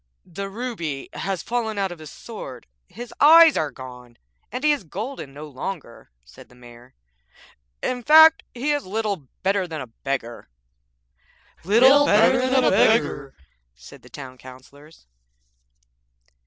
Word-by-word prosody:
'The 195 Hz, +3 st, -7 dB
ruby 195 Hz, -, -5 dB
has 195 Hz, -3 st, -4 dB
fallen 225 Hz, -3 st, -3 dB
out 195 Hz, -2 st, -1 dB
of 175 Hz, -, -10 dB
his 155 Hz, -1 st, -11 dB
sword, 135 Hz, -, -10 dB, 0.2 s
his 240 Hz, +3 st, -10 dB
eyes 325 Hz, +1 st, +7 dB
are 155 Hz, -, -1 dB
gone, 125 Hz, -3 st, -12 dB, 0.3 s
and 255 Hz, -, -6 dB
he 300 Hz, -, +4 dB
is 290 Hz, -7 st, -1 dB
golden 200 Hz, -, -7 dB
no 150 Hz, +2 st, -10 dB
longer,' 140 Hz, -, -8 dB, 0.2 s
said -, -, -17 dB
the 125 Hz, -, -20 dB
Mayor; 120 Hz, +1 st, -17 dB, 0.9 s
'in 250 Hz, -1 st, -2 dB
fact, 315 Hz, +5 st, +7 dB
he 270 Hz, +5 st, -1 dB
is 290 Hz, -1 st, -1 dB
little 200 Hz, -6 st, -4 dB, 0.2 s
better 195 Hz, -1 st, 0 dB
than 160 Hz, -2 st, -6 dB
a 130 Hz, -, -6 dB
beggar!' 120 Hz, -, -6 dB, 1.1 s
'Little 260 Hz, -, +5 dB
better 255 Hz, +5 st, +3 dB
than 260 Hz, 0 st, +2 dB
a -, -, +3 dB
beggar,' 145 Hz, -, +1 dB, 0.4 s
said 60 Hz, +1 st, -15 dB
the -, -, -17 dB
Town 130 Hz, -3 st, -11 dB
Councillors. 130 Hz, -, -16 dB
190 Hz, 140 wpm, -22 LUFS, -, 1.1 s, eyes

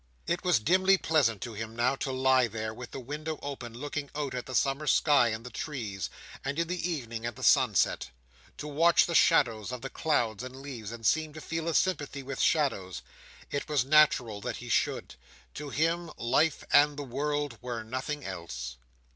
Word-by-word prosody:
It 175 Hz, +1 st, -1 dB
was 180 Hz, -4 st, +4 dB
dimly 185 Hz, -, +4 dB
pleasant 135 Hz, -, +1 dB
to 120 Hz, -, -6 dB
him 110 Hz, +1 st, -6 dB
now, 125 Hz, +3 st, +2 dB
to 135 Hz, -, -3 dB
lie 130 Hz, -1 st, +3 dB
there, 110 Hz, 0 st, -4 dB
with 125 Hz, +2 st, -8 dB
the -, -, -7 dB
window 150 Hz, +5 st, -5 dB
open, 135 Hz, -4 st, -5 dB
looking 145 Hz, +2 st, -4 dB
out 145 Hz, -3 st, -2 dB
at 125 Hz, -1 st, -4 dB
the 130 Hz, -, -5 dB
summer 140 Hz, +4 st, +1 dB
sky 140 Hz, -2 st, +5 dB
and 110 Hz, +1 st, -4 dB
the 125 Hz, -, -8 dB
trees: 110 Hz, -, -4 dB, 0.3 s
and, 140 Hz, +2 st, -3 dB
in 170 Hz, 0 st, 0 dB
the 180 Hz, 0 st, -2 dB
evening, 115 Hz, -7 st, -4 dB
at 120 Hz, -1 st, -3 dB
the -, -, -9 dB
sunset. -, -, +3 dB, 0.5 s
To 150 Hz, -, -6 dB
watch 165 Hz, +4 st, +4 dB
the 170 Hz, -, -3 dB
shadows 120 Hz, -10 st, +3 dB
of 125 Hz, 0 st, -6 dB
the 135 Hz, -, -5 dB
clouds 120 Hz, -9 st, 0 dB
and 130 Hz, 0 st, -7 dB
leaves, 130 Hz, -6 st, -7 dB
and 115 Hz, -1 st, -8 dB
seem 155 Hz, +6 st, +2 dB
to 155 Hz, -, -8 dB
feel 165 Hz, +1 st, -4 dB
a 165 Hz, -, 0 dB
sympathy 145 Hz, -7 st, 0 dB
with 135 Hz, 0 st, -4 dB
shadows. 115 Hz, -, +1 dB, 0.5 s
It 145 Hz, -, -3 dB
was 145 Hz, -5 st, +2 dB
natural 130 Hz, -8 st, +4 dB
that -, -, -4 dB
he -, -, -9 dB
should. -, -, 0 dB, 0.4 s
To 150 Hz, -1 st, -6 dB
him, 165 Hz, +3 st, 0 dB
life 145 Hz, +6 st, +2 dB
and 145 Hz, 0 st, +6 dB
the 145 Hz, -, -3 dB
world 145 Hz, -1 st, -2 dB
were 120 Hz, -2 st, -4 dB
nothing 130 Hz, +5 st, -4 dB
else. 65 Hz, -10 st, -6 dB
135 Hz, 195 wpm, -29 LUFS, 115-150 Hz, 0.5 s, and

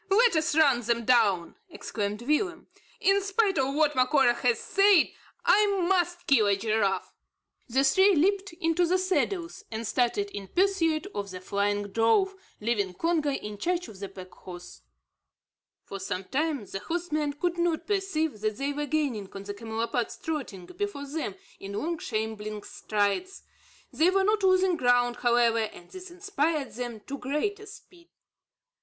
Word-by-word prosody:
Let 445 Hz, +1 st, +4 dB
us 315 Hz, -1 st, +1 dB
run 280 Hz, -6 st, +4 dB
them 235 Hz, 0 st, -1 dB
down," 210 Hz, -, +2 dB
exclaimed 210 Hz, -7 st, -4 dB
Willem. 340 Hz, +6 st, 0 dB, 0.4 s
"In 390 Hz, +1 st, +4 dB
spite 395 Hz, -3 st, +1 dB
of 270 Hz, +1 st, 0 dB
what 300 Hz, -1 st, +3 dB
Macora 255 Hz, -1 st, +4 dB
has 240 Hz, -1 st, +1 dB
said, 395 Hz, -4 st, +4 dB, 0.3 s
I 420 Hz, 0 st, +5 dB, 0.2 s
must 350 Hz, -2 st, +1 dB
kill 230 Hz, -7 st, +4 dB
a 200 Hz, -, +4 dB
giraffe!" 215 Hz, -2 st, 0 dB, 0.6 s
The 265 Hz, +3 st, +2 dB
three 380 Hz, +8 st, +5 dB
leaped 390 Hz, +5 st, +1 dB
into 335 Hz, 0 st, +1 dB
the 365 Hz, +2 st, +3 dB
saddles, 370 Hz, +1 st, -1 dB
and 225 Hz, +1 st, -4 dB
started 215 Hz, -4 st, 0 dB
in 200 Hz, -1 st, -7 dB
pursuit 350 Hz, -, +1 dB
of 200 Hz, 0 st, -4 dB
the 185 Hz, -1 st, -7 dB
flying 205 Hz, +2 st, -1 dB
drove, 230 Hz, -, +2 dB, 0.3 s
leaving 210 Hz, -4 st, -1 dB
Congo 330 Hz, -, +1 dB
in 210 Hz, -7 st, -4 dB
charge 355 Hz, -, -1 dB
of 200 Hz, -3 st, -12 dB
the 200 Hz, -1 st, -6 dB
pack 185 Hz, -1 st, -11 dB
horse. 175 Hz, -1 st, -11 dB, 1.0 s
For 195 Hz, -, -7 dB
some 190 Hz, -1 st, -4 dB
time, 285 Hz, -, -1 dB
the 195 Hz, -, -6 dB
horsemen 310 Hz, -, -2 dB
could 345 Hz, +4 st, -2 dB
not 340 Hz, -2 st, 0 dB
perceive 320 Hz, -, -1 dB
that 215 Hz, -1 st, -1 dB
they 280 Hz, +2 st, -2 dB
were 295 Hz, +1 st, -3 dB
gaining 265 Hz, -10 st, -1 dB
on 195 Hz, -, -7 dB
the 205 Hz, 0 st, -5 dB
camelopards 225 Hz, +2 st, -3 dB
trotting 270 Hz, -, -5 dB
before 385 Hz, -, -5 dB
them 280 Hz, -8 st, -4 dB, 0.2 s
in 195 Hz, +1 st, -7 dB
long 325 Hz, +10 st, -2 dB
shambling 215 Hz, -1 st, -4 dB
strides. 215 Hz, -, -2 dB, 0.5 s
They 330 Hz, +3 st, +4 dB
were 385 Hz, +1 st, +2 dB
not 425 Hz, +1 st, +2 dB
losing 370 Hz, -2 st, +3 dB
ground, 245 Hz, -2 st, +2 dB
however, 235 Hz, -1 st, +3 dB
and 215 Hz, -5 st, -5 dB
this 370 Hz, 0 st, -9 dB
inspired 330 Hz, -6 st, -1 dB
them 240 Hz, -2 st, -6 dB
to 280 Hz, +6 st, -7 dB
greater 405 Hz, +11 st, -2 dB
speed. 360 Hz, -5 st, -15 dB
280 Hz, 160 wpm, -27 LUFS, 215-350 Hz, 1.0 s, I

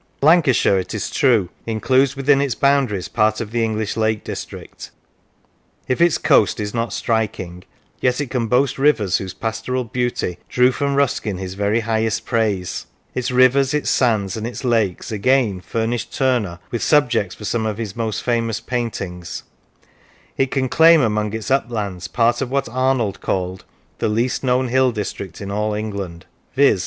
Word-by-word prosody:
Lancashire, 150 Hz, -, +4 dB
it 90 Hz, -, -5 dB
is -, -, -3 dB
true, 115 Hz, -9 st, +3 dB, 0.2 s
includes 130 Hz, +4 st, +2 dB
within 140 Hz, 0 st, +3 dB
its 135 Hz, -5 st, -1 dB
boundaries 135 Hz, -9 st, +1 dB
part 110 Hz, -1 st, +1 dB
of 110 Hz, -2 st, -5 dB
the 120 Hz, 0 st, 0 dB
English 110 Hz, -2 st, -2 dB
Lake 110 Hz, -1 st, 0 dB
District; -, -, -8 dB, 1.0 s
if 130 Hz, -, 0 dB
its 170 Hz, -1 st, +4 dB
coast 105 Hz, -, +3 dB
is 105 Hz, -1 st, -3 dB
not 115 Hz, 0 st, -1 dB
striking, 95 Hz, -6 st, -2 dB, 0.4 s
yet 125 Hz, +1 st, +1 dB
it 140 Hz, -3 st, -3 dB
can 120 Hz, -3 st, -1 dB
boast 130 Hz, +3 st, +1 dB
rivers 135 Hz, -10 st, +3 dB
whose 95 Hz, -2 st, -6 dB
pastoral 115 Hz, +3 st, -2 dB
beauty 120 Hz, -7 st, -2 dB
drew 125 Hz, +1 st, +4 dB
from 140 Hz, +1 st, -1 dB
Ruskin 125 Hz, -8 st, 0 dB
his 95 Hz, 0 st, -5 dB
very 105 Hz, +3 st, 0 dB
highest 110 Hz, 0 st, -1 dB
praise; 105 Hz, -6 st, -1 dB, 0.3 s
its 125 Hz, -, -2 dB
rivers, 130 Hz, +2 st, +4 dB
its 150 Hz, -, 0 dB
sands, 110 Hz, -7 st, +1 dB
and 110 Hz, 0 st, -4 dB
its 120 Hz, -, -7 dB
lakes, 115 Hz, -8 st, 0 dB
again, 110 Hz, -3 st, +1 dB
furnished 115 Hz, +5 st, -2 dB
Turner 120 Hz, -10 st, 0 dB
with 120 Hz, -, -2 dB
subjects 125 Hz, -, +2 dB
for 105 Hz, -, -9 dB
some 110 Hz, +1 st, -1 dB
of 105 Hz, -1 st, -3 dB
his 110 Hz, -4 st, -5 dB
most 115 Hz, -2 st, -3 dB
famous 115 Hz, -2 st, 0 dB
paintings; 95 Hz, -8 st, -4 dB, 0.9 s
it 135 Hz, -1 st, +1 dB
can 130 Hz, -1 st, 0 dB
claim 165 Hz, +3 st, +6 dB
among 105 Hz, -3 st, 0 dB
its 110 Hz, +3 st, -4 dB
uplands 105 Hz, -9 st, -1 dB
part 120 Hz, +1 st, +1 dB
of 130 Hz, -, -2 dB
what 140 Hz, +1 st, 0 dB
Arnold 125 Hz, -4 st, 0 dB
called 90 Hz, 0 st, -3 dB, 0.2 s
" -, -, -38 dB
the -, -, 0 dB
least 115 Hz, +6 st, 0 dB
known 125 Hz, 0 st, +1 dB
hill 130 Hz, +1 st, +3 dB
district 100 Hz, -5 st, -5 dB
in 100 Hz, 0 st, -5 dB
all 105 Hz, +1 st, -1 dB
England" 100 Hz, -5 st, -5 dB, 0.3 s
viz. 140 Hz, -8 st, +4 dB
115 Hz, 170 wpm, -20 LUFS, 105-130 Hz, 1.0 s, claim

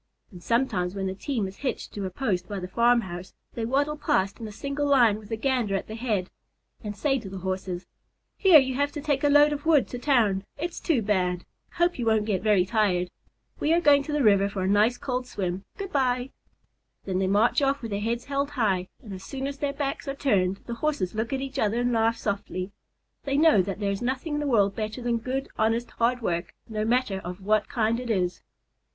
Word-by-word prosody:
And 180 Hz, -3 st, -12 dB
sometimes, 200 Hz, -6 st, 0 dB
when 195 Hz, -1 st, -2 dB
the 190 Hz, -, -2 dB
team 220 Hz, 0 st, -2 dB
is 190 Hz, -, -10 dB
hitched 270 Hz, -, -4 dB
to 205 Hz, -, -4 dB
a -, -, -4 dB
post 185 Hz, -3 st, -2 dB
by 200 Hz, -2 st, -3 dB
the 180 Hz, -, -5 dB
farmhouse, 190 Hz, -4 st, +1 dB, 0.2 s
they 230 Hz, -, -3 dB
waddle 285 Hz, +4 st, +1 dB
past 195 Hz, -8 st, 0 dB
in 225 Hz, -, -5 dB
a -, -, -8 dB
single 280 Hz, +6 st, -3 dB
line 240 Hz, -7 st, +4 dB
with 210 Hz, -1 st, -14 dB
the 225 Hz, -, -2 dB
Gander 240 Hz, -5 st, 0 dB
at 195 Hz, -, -2 dB
the 215 Hz, -, -8 dB
head, 220 Hz, -5 st, -2 dB, 0.5 s
and 210 Hz, -1 st, -5 dB
say 270 Hz, +3 st, +1 dB
to 205 Hz, -5 st, -8 dB
the 195 Hz, -, -7 dB
Horses: 185 Hz, -1 st, -4 dB, 0.5 s
"Hear 375 Hz, -6 st, +7 dB
you 265 Hz, -2 st, +3 dB
have 285 Hz, +2 st, 0 dB
to 300 Hz, -, -4 dB
take 285 Hz, -1 st, 0 dB
a 290 Hz, -, +4 dB
load 290 Hz, +1 st, +6 dB
of 290 Hz, 0 st, -5 dB
wood 315 Hz, -4 st, +4 dB
to 245 Hz, -, -5 dB
town. 225 Hz, -9 st, +2 dB
It's 340 Hz, +3 st, -4 dB
too 280 Hz, -10 st, +1 dB
bad. 180 Hz, -3 st, 0 dB, 0.3 s
Hope 345 Hz, -4 st, +1 dB
you 235 Hz, -, -1 dB
won't 220 Hz, -1 st, +3 dB
get 200 Hz, -4 st, 0 dB
very 205 Hz, -3 st, +3 dB
tired. 185 Hz, -4 st, +1 dB, 0.5 s
We 310 Hz, -, +2 dB
are 340 Hz, -, +4 dB
going 290 Hz, -4 st, +5 dB
to 285 Hz, -, -6 dB
the 295 Hz, -2 st, +1 dB
river 200 Hz, -2 st, +4 dB
for 195 Hz, -2 st, -3 dB
a -, -, 0 dB
nice 210 Hz, +5 st, +3 dB
cold 250 Hz, -1 st, -3 dB
swim. 190 Hz, -4 st, -3 dB
Good 390 Hz, -1 st, -5 dB
bye." 255 Hz, -2 st, 0 dB, 0.7 s
Then 185 Hz, -1 st, -1 dB
they 190 Hz, -, +1 dB
march 210 Hz, +8 st, +3 dB
off 275 Hz, -1 st, +1 dB
with 225 Hz, -, -5 dB
their 200 Hz, -, -1 dB
heads 235 Hz, +2 st, -2 dB
held 280 Hz, 0 st, -1 dB
high, 205 Hz, -10 st, 0 dB, 0.2 s
and 210 Hz, -4 st, -8 dB
as 190 Hz, 0 st, -8 dB
soon 270 Hz, -1 st, -5 dB
as 280 Hz, 0 st, -5 dB
their 285 Hz, -1 st, 0 dB
backs 280 Hz, -1 st, -3 dB
are 275 Hz, -, -2 dB
turned, 195 Hz, -9 st, +1 dB
the 235 Hz, -, -4 dB
Horses 285 Hz, -13 st, 0 dB
look 220 Hz, +3 st, -2 dB
at 270 Hz, -1 st, -1 dB
each 270 Hz, 0 st, -4 dB
other 220 Hz, +1 st, +1 dB
and 245 Hz, 0 st, +1 dB
laugh 225 Hz, 0 st, +2 dB
softly. 200 Hz, -2 st, -3 dB, 0.5 s
They 275 Hz, 0 st, 0 dB
know 310 Hz, -9 st, +6 dB
that 195 Hz, +2 st, -4 dB
there 200 Hz, -1 st, 0 dB
is 200 Hz, -, -3 dB
nothing 260 Hz, +5 st, -2 dB
in 295 Hz, -, 0 dB
the 295 Hz, -, -2 dB
world 200 Hz, -6 st, +3 dB
better 215 Hz, +2 st, -4 dB
than 240 Hz, -1 st, 0 dB
good, 260 Hz, +3 st, -3 dB
honest, 225 Hz, +2 st, +1 dB
hard 240 Hz, +1 st, 0 dB
work, 170 Hz, -3 st, -2 dB
no 215 Hz, -1 st, -2 dB
matter 235 Hz, -4 st, +1 dB
of 180 Hz, +1 st, -7 dB
what 215 Hz, +1 st, +2 dB
kind 230 Hz, -2 st, +1 dB
it 250 Hz, -1 st, -6 dB
is. 180 Hz, -5 st, 0 dB
230 Hz, 230 wpm, -26 LUFS, 195-275 Hz, 0.7 s, Hear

